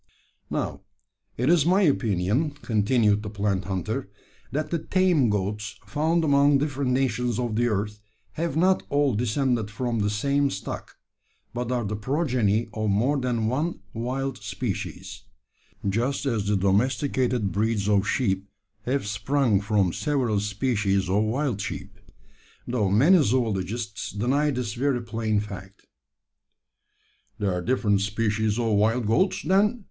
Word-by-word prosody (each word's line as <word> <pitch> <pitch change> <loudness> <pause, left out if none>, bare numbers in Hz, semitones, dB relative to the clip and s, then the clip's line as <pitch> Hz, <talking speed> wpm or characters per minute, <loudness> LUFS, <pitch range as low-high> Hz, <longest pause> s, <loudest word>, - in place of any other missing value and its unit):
"Now, - - -3 0.6
it 125 - 0
is 165 -2 +5
my 185 +5 +3
opinion," 120 - +1
continued 105 -1 +2
the 105 - -6
plant 100 -2 -1
hunter, 95 -3 -3 0.4
"that 155 +3 -2
the 170 - 0
tame 175 -7 +2
goats 105 +1 -2
found 160 +3 +1
among 140 -1 +4
different 140 -2 -1
nations 125 -3 0
of 120 -3 -2
the 120 +2 +2
earth 105 -1 -2 0.3
have 165 -2 -2
not 185 +3 +3
all 145 -2 +2
descended 120 0 0
from 115 +1 -2
the 105 0 +1
same 140 +7 +1
stock; 95 - -6 0.6
but 120 0 -3
are 120 -3 0
the 105 +1 -2
progeny 120 -3 0
of 110 -1 -1
more 115 +9 +2
than 120 -3 -1
one 145 +9 -1
wild 130 +3 -3
species - - -5 0.7
just 120 +9 0
as 110 -7 0
the 105 -1 +2
domesticated 120 +2 +1
breeds 105 0 0
of 100 0 +2
sheep 100 -7 0 0.4
have 135 -1 0
sprung 115 +1 +1
from 100 -4 +1
several 130 -9 0
species 105 -3 0
of 100 +2 +3
wild 120 -2 -1
sheep; - - -6 0.7
though 115 -5 0
many 150 - +5
zoologists 110 -3 -1
deny 130 +8 +1
this 125 -5 -2
very 125 0 0
plain 110 -2 -1
fact." 100 -1 -8 1.5
"There 100 -3 0
are 90 - -2
different 105 -2 +1
species 105 +1 0
of 115 -2 +1
wild 110 +4 +2
goats, 150 - +1
then?" 205 +5 +2
115 Hz, 140 wpm, -25 LUFS, 105-135 Hz, 1.5 s, is